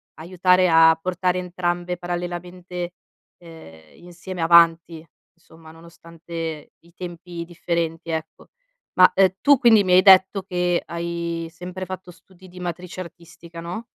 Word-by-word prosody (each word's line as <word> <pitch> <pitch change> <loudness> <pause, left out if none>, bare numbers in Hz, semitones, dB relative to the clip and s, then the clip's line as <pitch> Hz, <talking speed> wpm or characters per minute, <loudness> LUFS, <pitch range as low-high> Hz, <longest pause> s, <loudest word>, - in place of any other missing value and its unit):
aiutare 180 +2 +2
a 165 -1 +5
portare 180 +1 -1
entrambe 175 0 -3
parallelamente, 175 0 -6 0.4
ehm, 80 - -16
insieme 175 +1 -8
avanti; 165 -1 +3 0.3
somma, 160 -1 -18
nonostante 165 -1 -9
i 170 0 -24
tempi 175 -1 -8
differenti, 170 -1 -4
ecco. 160 -1 -6 0.5
Ma, 185 0 +6
ehm, 190 -1 +3
tu 285 -2 +5
quindi 225 -4 +5
mi 185 -1 +1
hai 185 - +7
detto 190 0 +6
che 180 -2 -1
hai 170 -1 -5
sempre 180 +2 -7
fatto 185 -1 -8
studi 185 +1 -18
di 180 0 -13
matrice 180 +1 -6
artistica, 170 -1 -12
no? 175 +7 -7
175 Hz, 130 wpm, -22 LUFS, 165-180 Hz, 0.5 s, hai